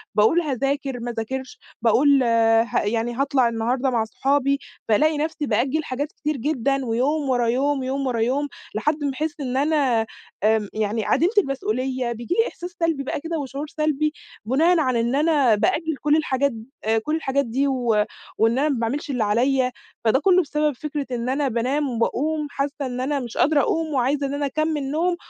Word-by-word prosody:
باقول 220 +11 +4
هاذاكر، 275 -2 -2
ما 240 +1 -4
اذاكرش، 255 +3 -5 0.2
باقول 270 +4 +4
ها 230 0 +3
يعني 230 +3 -1
هاطلع 270 -2 +2
النهارده 245 +4 0
مع 235 -3 +1
أصحابي، 275 +4 +1 0.3
فألاقي 300 +8 +3
نفسي 305 0 -2
بأجِل 260 +6 0
حاجات 285 +4 -3
كتير 300 -1 -3
جدًا، 275 0 0
ويوم 270 +6 0
ورا 245 -2 +2
يوم، 270 +3 +1
يوم 270 +1 -2
ورا 240 -3 -1
يوم، 265 +6 +1 0.3
لحد 295 +7 0
ما 285 - 0
احس 305 +2 -3
إن 260 -2 -2
أنا 275 -6 +2 0.4
آمم 215 -1 +3
يعني 215 0 -1
عديمة 345 +4 +2
المسؤولية. 260 - 0
بييجي 235 +10 -3
لي 455 - +3
إحساس 355 - -7
سلبي 330 -5 0
بقى 275 - -3
كده، 330 +2 -4
وشعور 280 +2 -5
سلبي 305 -1 0 0.3
بناءً 320 +9 +3
على 255 -6 +1
إن 235 +3 0
أنا 290 -6 +3
بأجِل 310 +9 0
كل 300 +1 +3
الحاجات 280 -3 +1 0.5
كل 305 +5 -1
الحاجات 280 -3 0
دي 260 +5 0
و 265 -2 0 0.6
وإن 225 +3 +3
أنا 300 +2 +2
ما 270 -5 0
باعملش 245 +6 -2
اللي 250 -5 0
عليَّ. 250 +5 +2 0.3
فده 225 +4 +4
كله 370 +3 +4
بسبب 300 -1 0
فكرة 295 +1 -4
إن 240 0 -2
أنا 275 +2 +1
بانام 265 +4 0
وباقوم 295 +6 -1
حاسة 280 0 -2
إن 250 -2 -3
أنا 280 +2 0
مش 240 -3 -7
قادرة 295 0 +4
أقوم 325 -5 -1
وعايزة 275 +2 +1
إن 275 - -4
أنا 285 0 -1
أكمل 295 -1 -1
نوم، 345 +3 +1
275 Hz, 180 wpm, -23 LUFS, 240-300 Hz, 0.6 s, باقول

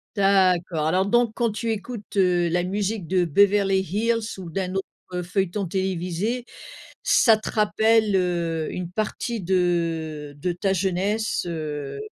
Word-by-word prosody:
D'accord. 185 -5 +2
Alors 185 +3 +2
donc, 240 +2 +3
quand 235 -3 +1
tu 225 +2 -2
écoutes, 215 -1 -6
heu, 180 -2 +3
la 175 +1 +1
musique 200 0 -2
de 185 0 +2
Beverly 195 +3 +3
Hills 220 +4 -1
ou 180 - -7
d'un 185 +2 -3
autre, 195 - -1 0.3
heu, 180 0 -2
feuilleton 190 +2 -1
télévisé, 190 +5 -2 0.6
ça 225 -2 +5
te 215 - -6
rappelle, 220 -1 +3
heu, 170 -3 -1
une 180 -1 -5
partie 215 +2 -3
de 165 -5 -1
de 175 +5 -1
ta 190 +3 -1
jeunesse 195 +4 0
heu 150 -4 -4
190 Hz, 145 wpm, -24 LUFS, 175-210 Hz, 0.6 s, ça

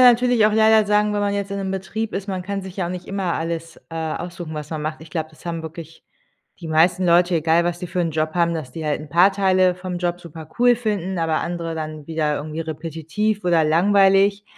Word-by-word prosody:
natürlich 245 -2 +5
auch 215 - +1
leider 220 0 +5
sagen, 210 0 +2
wenn 205 - 0
man 200 0 0
jetzt 200 0 -3
in 200 - -3
'nem 195 -1 -3
Betrieb 210 +3 -4
ist, 195 +1 -4
man 190 -2 -3
kann 195 +1 -4
sich 190 -1 -9
ja 185 -3 -1
auch - - -4
nicht 180 -1 -6
immer 195 -3 -1
alles, 165 0 -4
äh, - - -8
aussuchen, 165 +1 -5
was 150 -1 -6
man 155 -2 -3
macht. 155 0 -4
Ich 160 -1 -13
glaube, 160 -1 -3
das 155 - -20
haben 165 -1 -4
wirklich 165 0 -10 0.6
die 170 - -7
meisten 170 +4 +3
Leute, 175 +1 +4
egal 165 +1 +3
was 175 0 -1
sie 180 - -4
für 180 +1 -3
'n 170 - +1
Job 155 0 -1
haben, 170 -1 +1
dass 150 -6 -6
die 160 +4 -6
halt 150 -1 -1
'n 150 - -10
paar 175 +6 +5
Teile 185 -2 +3
vom 180 0 -5
Job 175 0 -1
supercool 170 +9 0
finden, 200 -6 -2
aber 160 -1 0
andere 170 -1 -4
dann 155 -2 -6
wieder 155 -2 0
irgendwie 155 +2 -5
repetitiv 165 +7 -3
oder 170 -2 +3
langweilig. 195 +4 +4
175 Hz, 235 wpm, -21 LUFS, 160-195 Hz, 0.6 s, natürlich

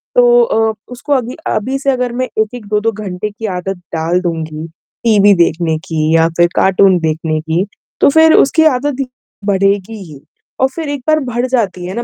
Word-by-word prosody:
तो 485 -1 +5
अ, 225 - +1 0.2
उसको 280 +4 -3
अगल 255 -2 -1 0.2
अभी 260 +6 -1
से 275 0 +1
अगर 250 -2 -1
मैं 255 +1 -1 0.2
1-1 220 +1 -5
2-2 210 +2 0
घंटे 210 -1 -5
की 210 +2 -8
आदत 195 +1 -4 0.2
डाल 165 +3 0
दूँगी 160 -2 -4 0.4
टीवी 205 -3 +5
देखने 165 -1 -1
की 160 -1 0
या 165 0 +4
फिर 175 - +5
कार्टून 190 0 +4
देखने 160 -1 -1
की, 165 +4 -1 0.4
तो - - +6
फिर 320 +2 +5
उसकी 320 +3 +4
आदत 275 -1 +1 0.4
बढ़ेगी 200 +2 0
ही 150 -5 -13 0.4
और 265 - +5
फिर 320 -3 -4
एक 285 -2 -4
बार 310 0 +3
बढ़ 245 -2 -2
जाती 205 -8 -1
है 185 - -5
ना 235 - -3
210 Hz, 185 wpm, -14 LUFS, 175-255 Hz, 0.4 s, तो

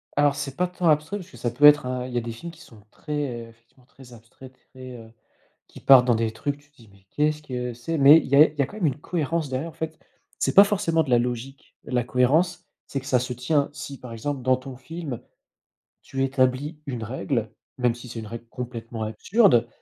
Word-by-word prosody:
Alors, 145 -1 +3
c'est 135 -2 -5
pas 180 +3 +1
tant 180 -1 -2
abstrait 155 +7 +1
parce 185 -2 -10
que - - -14
ça 120 - -2
peut 125 +5 +3
être 150 -2 +8
un 125 0 -3
il 125 - -9
y - - -1
a - - +1
des 115 0 -5
films 170 +10 -8
qui 165 0 -17
sont 115 -9 -16
très 145 -6 -4
effectivement 115 +2 -25
très 130 -2 -16
abstraits 120 +3 -15 0.2
très, 130 -1 -10
heu, 110 -1 -13 0.6
qui - - -14
partent 130 -2 +7
dans 120 -2 +3
des 110 0 0
trucs, 140 +5 -3
tu 145 0 -26
te - - -38
dis: 115 - -18
«Mais 100 -1 -23
qu'est 150 +6 +1
ce 150 - -10
que 125 -4 -4
c'est?» 120 +8 -4
mais 145 +2 +8
il - - -7
y 140 - +2
a 150 +3 +8
il 155 - -13
y - - +2
a - - +2
quand 210 - -11
même 180 - -1
une 145 0 0
cohérence 165 -3 -2
derrière, 130 +6 -3
en - - -11
fait, 160 0 -6 0.4
c'est - - 0
pas 200 - +11
forcément 170 -6 +1
de - - -8
la 120 -1 +4
logique, 125 +3 -5
la 125 -1 -1
cohérence 145 +9 +1 0.2
c'est 140 - -3
que 130 - -13
ça 130 -3 +2
se 125 - -4
tient. 140 +4 0
Si, 145 -2 -8
par 125 -2 -10
exemple, 135 +4 -4
dans 130 +1 +2
ton 130 0 -9
film, 150 -1 -7 0.8
tu 135 - -5
établis 135 +3 0
une 125 -5 -5
règle, 115 0 -2 0.3
même 125 -2 +1
si 120 +1 -11
c'est 115 -1 -6
une 110 - -7
règle 115 +1 -8
complètement 115 -2 -6
absurde 120 - +3
130 Hz, 245 wpm, -24 LUFS, 120-150 Hz, 0.8 s, pas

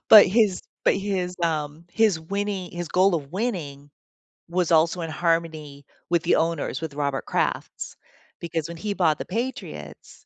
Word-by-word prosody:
But 215 -2 +11
his 200 -1 +3 0.2
but - - +5
his, 190 -3 -2
um, 155 -1 -1
his 215 -7 +3
winning 200 +1 -3
his 175 -1 -5
goal 185 +2 +4
of 140 -3 -7
winning 160 - -3 0.6
was 175 -1 0
also 165 +2 +4
in 165 - -3
harmony 155 -3 -1 0.3
with 170 -2 +3
the 170 - +4
owners, 165 -4 0
with 160 -3 -4
Robert 140 -2 -2
Kraft's, - - -2 0.4
because 165 -2 -3
when 170 0 -7
he 205 +3 -2
bought 160 -6 +2
the - - -5
Patriots, 235 +8 -6
170 Hz, 160 wpm, -25 LUFS, 155-190 Hz, 0.6 s, But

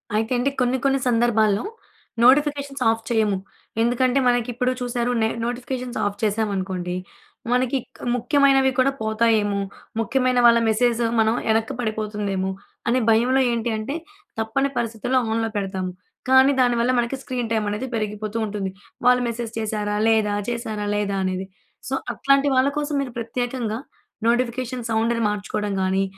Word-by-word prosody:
అయితే 220 +3 0
అండి, 245 +3 +1
కొన్ని 250 +1 +2
కొన్ని 270 0 +3
సందర్భాల్లో 225 -3 +2 0.6
నోటిఫికేషన్స్‌ 280 +1 +3
ఆఫ్ 225 0 0
చేయము. 215 -4 +2 0.4
ఎందుకంటే 250 +3 +2
మనకిప్పుడు 245 +1 +1
చూశారు 245 0 -1
నే 220 - +3 0.2
నోటిఫికేషన్స్‌ను 245 +1 -4
ఆఫ్ 205 0 -5
చేశామనుకోండి. 195 -4 -1 0.6
మనకి 255 +1 +1 0.2
క్ - - -25 0.2
ముఖ్యమైనవి 270 +1 +3
కూడా 265 +2 +4
పోతాయేమో, 220 -2 +2 0.4
ముఖ్యమైన 255 +2 +1
వాళ్ల 235 0 +7
మెసేజ్ 235 +1 +2 0.2
మనం 220 0 +3
వెనక్కి 220 0 +1
పడిపోతుందేమో, 210 -4 -2 0.4
అనే 245 +2 +3
భయంలో 245 +4 +4
ఏంటంటే, 230 +2 -2 0.4
తప్పని 230 +5 0
పరిస్థితుల్లో 235 +2 0
ఆన్‌లో 225 0 0
పెడతాము. 190 -2 -3 0.4
కానీ 265 +1 +6
దానివల్ల 240 0 +2
మనకి 240 +2 -1
స్క్రీన్ 245 -3 -3
టైమ్ 220 -2 +1
అనేది 210 +6 -3
పెరిగిపోతూ 215 0 -3
ఉంటుంది. 205 -2 -3 0.4
వాళ్లు 250 0 +5
మెసేజ్ 235 -1 -4
చేశారా 210 -1 -2
లేదా, 220 -2 +3 0.2
చేశారా 225 -3 -3
లేదా 200 -1 -1
అనేది. 185 0 -2 0.4
సో, - - -3 0.2
అట్లాంటి 275 +1 +3
వాళ్ల 260 +1 +4
కోసం 295 0 -1
మీరు 260 -3 -5
ప్రత్యేకంగా 235 -1 -3 0.5
నోటిఫికేషన్ 245 0 0
సౌండ్‌ను 230 +1 +1
మార్చుకోవడం 210 0 -3
కానీ, 190 +1 +1
230 Hz, 135 wpm, -23 LUFS, 215-250 Hz, 0.6 s, వాళ్ల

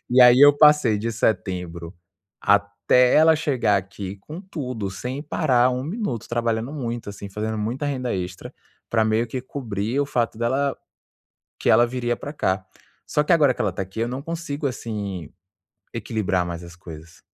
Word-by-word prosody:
E 125 +1 +5
aí, 125 0 +8
eu 145 0 +8
passei 150 -8 +5
de 115 +3 -2
setembro 90 -6 -2 0.5
até 100 +5 +3
ela 160 +1 +6
chegar 130 -9 +1
aqui 100 0 -5
com 155 - -9
tudo, 130 - -5
sem 125 +7 -5
parar 130 -6 +2
1 125 0 -2
minuto 165 - -4
trabalhando 115 +1 -1
muito, 120 -7 -4
assim, 100 0 -8
fazendo 110 +2 -3
muita 120 +7 -2
renda 130 -4 -2
extra 90 -1 -6 0.4
pra 110 -1 +3
meio 110 +2 +1
que 125 +2 -4
cobrir 115 -3 -3
o 145 - 0
fato 120 -5 -1
dela 135 +4 0 0.8
que - - 0
ela 120 - +6
viria 120 -1 -2
pra 145 - -7
cá. 95 -9 -1 0.4
Só 150 - +1
que, 150 - 0
agora 145 -6 +4
que - - -4
ela 100 - 0
tá 95 - -4
aqui, 95 +4 -9
eu 115 - 0
não 130 +2 -4
consigo, 160 -3 -4
assim, 100 - -5 0.6
equilibrar 105 -5 -1
mais 85 0 -6
as 85 0 -11
coisas. 80 -2 -12
115 Hz, 175 wpm, -23 LUFS, 100-135 Hz, 0.8 s, aí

